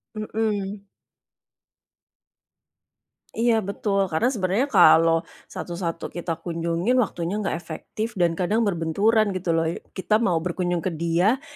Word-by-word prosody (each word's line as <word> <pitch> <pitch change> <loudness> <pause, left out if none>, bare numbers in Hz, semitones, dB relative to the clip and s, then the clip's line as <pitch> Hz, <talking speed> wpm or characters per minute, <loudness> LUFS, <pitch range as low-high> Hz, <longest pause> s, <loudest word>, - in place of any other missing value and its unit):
Mhm. 210 -2 -3 2.5
Iya 235 0 +3
betul, 200 0 -1
karena 235 +11 +2
sebenernya 205 +5 0
kalau 165 +1 +6 0.3
satu-satu 170 -1 -4
kita 175 -1 -3
kunjungi 170 +3 -2
waktunya 175 -4 -2
gak 160 - -1
efektif 175 +7 -5
dan 170 -1 +4
kadang 205 +5 +1
berbenturan 200 +3 +2
gitu 185 -2 -4
loh, 165 - +1 0.3
kita 190 +3 -1
mau 180 -7 +2
berkunjung 175 -1 -1
ke 185 - 0
dia, 180 +10 +2
185 Hz, 115 wpm, -24 LUFS, 170-215 Hz, 2.5 s, kalau